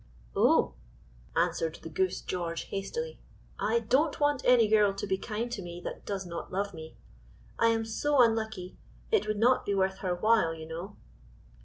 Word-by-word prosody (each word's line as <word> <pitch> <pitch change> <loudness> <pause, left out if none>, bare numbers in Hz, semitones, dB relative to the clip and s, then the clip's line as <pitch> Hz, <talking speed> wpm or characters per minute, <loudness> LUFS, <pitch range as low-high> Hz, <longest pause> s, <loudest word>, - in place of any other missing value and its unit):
"Oh!" - - +4 0.6
answered 165 -1 0
the 160 - -6
goose 185 +3 0
George 170 -2 -3
hastily, 475 - -4 0.4
"I 225 +2 +2
don't 275 +7 +2
want 290 -2 +2
any 245 -3 +5
girl 210 -2 +4
to 200 - -3
be 190 -2 +1
kind 230 +3 -3
to 220 - -4
me 175 -1 -7
that - - -7
does 195 -2 -3
not 170 -1 -6
love 200 +2 -2
me; 160 -1 -10 0.6
I 230 - +5
am 225 -1 +2
so 285 +6 +1
unlucky, 220 -5 +1 0.3
it - - +2
would 215 0 -1
not 245 +4 +4
be 200 - -1
worth 190 0 +1
her 180 -3 -1
while, 215 -4 +3
you 160 -1 -8
know." 175 +5 -7
205 Hz, 175 wpm, -29 LUFS, 180-230 Hz, 0.6 s, any